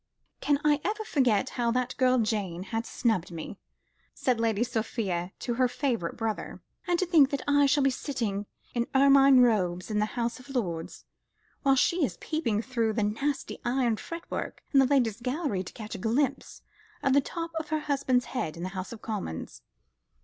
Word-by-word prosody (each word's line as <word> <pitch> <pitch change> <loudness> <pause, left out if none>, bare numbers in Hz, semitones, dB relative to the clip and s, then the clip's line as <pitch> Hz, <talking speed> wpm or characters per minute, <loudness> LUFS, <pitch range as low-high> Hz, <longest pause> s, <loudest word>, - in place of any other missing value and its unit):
"Can 290 -1 +2
I 295 0 +3
ever 430 +3 -1
forget 255 - +2
how 240 -2 0
that 250 0 -1
girl 255 -1 +4
Jane 205 -6 -1
has 225 +1 -1
snubbed 220 -8 0
me?" 165 +4 -7 0.6
said 250 -3 0
Lady 225 -1 +1
Sophia 205 -6 -2
to 240 - -3
her 255 +1 +3
favourite 245 - -2
brother. 225 -2 -3 0.3
"And 350 -1 +2
to 370 - +1
think 320 -6 +5
that 280 -2 -3
I 285 0 +5
shall 285 +1 +3
be 270 - +4
sitting 225 -7 -3 0.3
in 240 -1 0
ermine 275 -1 +7
robes 185 -5 +2
in 210 - +1
the 210 - +2
House 235 +1 -1
of 255 - -15
Lords, 175 -11 -3 0.6
while 270 -2 +4
she 340 +6 +2
is 180 -10 -1
peeping 235 -9 -1
through 230 -3 0
the 215 -1 0
nasty 270 +8 -2
iron 240 -2 +1
fretwork 335 +7 -6
in 275 - +7
the 265 - +5
Ladies' 240 -5 +1
Gallery 255 - -1
to 185 - -9
catch 215 -1 -8
a - - -5
glimpse 240 +8 -1 0.4
of 265 - +3
the 280 - +5
top 335 +4 -5
of 315 - -7
her 310 0 0
husband's 270 -4 +1
head 165 -11 -3
in 170 - -6
the 185 - -2
House 185 0 -6
of 230 -2 -10
Commons." 195 - -5
245 Hz, 185 wpm, -28 LUFS, 210-275 Hz, 0.6 s, ermine